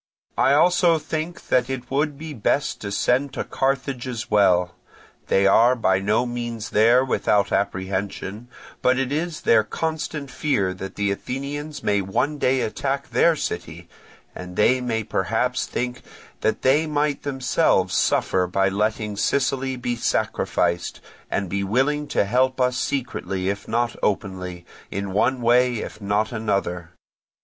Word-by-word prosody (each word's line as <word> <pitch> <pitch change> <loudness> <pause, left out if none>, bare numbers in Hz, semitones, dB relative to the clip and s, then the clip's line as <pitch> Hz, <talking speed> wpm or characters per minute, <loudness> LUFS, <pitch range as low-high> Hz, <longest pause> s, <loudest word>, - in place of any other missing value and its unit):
I 135 - +4
also 175 +1 +4
think 160 +2 -5
that 125 0 +2
it 130 -1 -5
would 145 +1 0
be 155 0 -7
best 140 +4 0
to 100 - -5
send 130 +6 +1
to - - -2
Carthage 135 -1 -1
as 120 -4 -5
well; 90 -4 +3 0.5
they 100 - +3
are 115 +5 +5
by 95 -6 +2
no 105 +5 +1
means 120 -3 -5
there 120 +4 +5
without 105 -5 +1
apprehension, 100 +3 -2 0.3
but 125 0 +3
it 135 0 -1
is 160 +2 -2
their 110 -2 +4
constant 155 +2 -4
fear 105 -11 0
that 95 +1 -8
the 100 -1 0
Athenians 145 +7 -5
may 100 -1 +2
one 140 +10 -1
day 130 -1 +2
attack 135 +4 -2
their 160 +8 +4
city, - - -5 0.5
and 90 0 -8
they 125 +6 +3
may 115 -3 -1
perhaps 115 +5 -1
think 125 +1 -3 0.4
that - - -1
they 145 +5 +3
might 150 -1 0
themselves 130 - +1
suffer 90 -1 +2
by 95 +1 +1
letting 105 +1 -1
Sicily 135 +3 0
be 125 -1 -2
sacrificed, 85 -6 -1 0.3
and 100 - -1
be 100 +2 -2
willing 135 +8 +1
to - - +1
help 130 +5 +1
us 125 -1 +2
secretly 120 -8 -2
if 100 +1 -4
not 120 +1 0
openly, 90 -3 -2 0.2
in 100 0 -4
one 125 +5 +1
way 125 +1 +4
if 110 -1 -6
not 105 +2 0
in 115 - -3
another. 100 -6 -2
120 Hz, 150 wpm, -23 LUFS, 100-135 Hz, 0.5 s, are